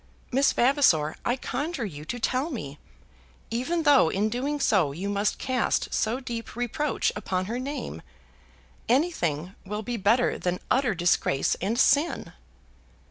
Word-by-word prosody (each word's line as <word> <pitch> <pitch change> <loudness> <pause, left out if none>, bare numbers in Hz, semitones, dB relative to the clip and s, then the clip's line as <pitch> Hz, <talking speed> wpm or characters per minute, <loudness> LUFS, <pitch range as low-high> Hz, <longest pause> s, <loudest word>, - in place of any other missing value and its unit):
Miss 270 +2 +4
Vavasor, 240 - +3
I 245 - +1
conjure 275 +1 -3
you 150 -6 -7
to 245 +9 -4
tell 260 +6 0
me, 150 - -6 0.7
even 270 +9 -1
though 285 - +6
in 205 +5 0
doing 275 +6 -2
so 190 - +3
you 190 +7 -4
must 205 +1 0
cast 255 -4 0
so 225 +4 0
deep 235 -3 -6
reproach 245 +5 -1
upon 185 -3 -2
her 235 +5 -3
name! 280 +3 -5 0.9
Anything 190 - +1
will 210 +2 -4
be 240 +2 -3
better 230 +5 +2
than 180 0 -1
utter 255 -6 +2
disgrace 175 -5 +2
and 210 +6 -1
sin!" 290 +5 +2
235 Hz, 140 wpm, -26 LUFS, 190-270 Hz, 0.9 s, though